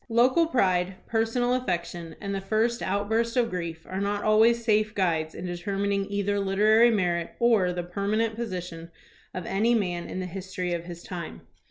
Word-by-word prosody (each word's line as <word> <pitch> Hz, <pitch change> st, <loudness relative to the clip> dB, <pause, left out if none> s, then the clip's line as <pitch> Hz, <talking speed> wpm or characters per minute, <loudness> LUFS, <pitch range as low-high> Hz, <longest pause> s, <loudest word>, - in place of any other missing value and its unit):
Local 255 Hz, +8 st, +4 dB
pride, 185 Hz, -, +1 dB
personal 230 Hz, +2 st, +1 dB
affection, 175 Hz, -8 st, -3 dB
and 200 Hz, -1 st, -4 dB
the 195 Hz, -, -2 dB
first 225 Hz, +4 st, 0 dB
outburst 220 Hz, +5 st, 0 dB
of 235 Hz, -2 st, +2 dB
grief 170 Hz, -3 st, -5 dB
are 190 Hz, +1 st, -3 dB
not 205 Hz, 0 st, -1 dB
always 225 Hz, +2 st, +4 dB
safe 215 Hz, -1 st, +2 dB
guides 165 Hz, -5 st, 0 dB
in 180 Hz, -, -6 dB
determining 195 Hz, +3 st, -2 dB
either 200 Hz, 0 st, 0 dB
literary 210 Hz, +4 st, +4 dB
merit 175 Hz, -6 st, 0 dB
or 225 Hz, -7 st, +3 dB
the 175 Hz, 0 st, -3 dB
permanent 205 Hz, +5 st, -1 dB
position 180 Hz, -7 st, -5 dB, 0.4 s
of 180 Hz, -2 st, -6 dB
any 220 Hz, +5 st, +2 dB
man 180 Hz, -5 st, -2 dB
in -, -, -4 dB
the 185 Hz, -, -3 dB
history 180 Hz, -1 st, -4 dB
of 170 Hz, 0 st, -3 dB
his 175 Hz, -1 st, -9 dB
time. 175 Hz, -3 st, -7 dB
200 Hz, 170 wpm, -26 LUFS, 180-225 Hz, 0.4 s, Local